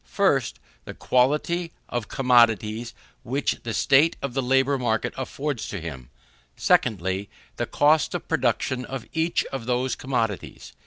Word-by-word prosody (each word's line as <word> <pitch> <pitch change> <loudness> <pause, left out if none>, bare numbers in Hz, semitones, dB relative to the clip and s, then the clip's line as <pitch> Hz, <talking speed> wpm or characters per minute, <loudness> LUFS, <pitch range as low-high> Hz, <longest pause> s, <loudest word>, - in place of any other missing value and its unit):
1st, - - +2 0.3
the - - -8
quantity 150 +7 +1 0.2
of 120 -4 -3
commodities 115 -3 +2 0.3
which 130 +3 -1
the 115 - -4
state 140 +8 +4
of 140 -3 -4
the 135 - 0
labour 135 +2 +2
market 110 -3 0
affords 130 0 -4
to 100 - -5
him; 70 -7 -8 0.5
2ndly, 95 -3 +1 0.3
the - - -2
cost 150 +2 +3
of - - -5
production 125 -1 0
of 130 -2 -6
each 165 +1 +1
of 125 -4 -5
those 125 +1 0
commodities. 115 -7 -3
125 Hz, 140 wpm, -24 LUFS, 110-135 Hz, 0.5 s, state